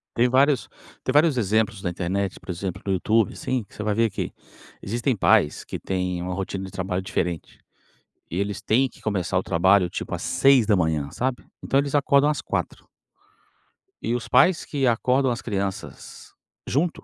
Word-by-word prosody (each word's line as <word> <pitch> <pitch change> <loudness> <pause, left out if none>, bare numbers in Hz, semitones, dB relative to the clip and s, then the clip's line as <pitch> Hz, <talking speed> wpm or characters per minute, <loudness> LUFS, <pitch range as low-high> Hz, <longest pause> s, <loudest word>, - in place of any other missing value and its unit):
Tem 120 +1 +3
vários 135 +1 +3 0.3
tem - - -1
vários 150 +1 +4
exemplos 110 -1 +1
na 90 - 0
internet, 95 +2 -2
por - - -19
exemplo, 90 0 -4
no 100 - 0
YouTube, 110 +4 +2
assim, 130 -4 -2
você 105 - -7
vai 105 0 0
ver 115 +2 +2
que 100 - -4 0.5
existem 120 +6 -1
pais 75 -6 +2
que - - -5
têm 90 -2 -2
uma 90 +1 -3
rotina 95 0 -4
de 95 - -8
trabalho 95 0 -2
diferente 85 -3 -3 0.7
e 85 - -3
eles 100 +1 -2
têm 125 +5 +2
que - - -20
começar 95 -4 -1
o - - -1
trabalho, 95 +2 +3
tipo, - - -5
às - - -4
6h, 100 - +3
sabe, 125 - -3 0.2
então 135 - +3
eles 140 0 -4
acordam 140 0 +4
às 150 - -1
4h. - - -4 1.2
E 115 - -1
os 120 - -4
pais 180 -2 +4
que 140 -3 -1
acordam 125 +3 +2
as 120 +2 -3
crianças 100 -3 -5 0.3
junto, 160 +5 -1
105 Hz, 175 wpm, -24 LUFS, 95-130 Hz, 1.2 s, vários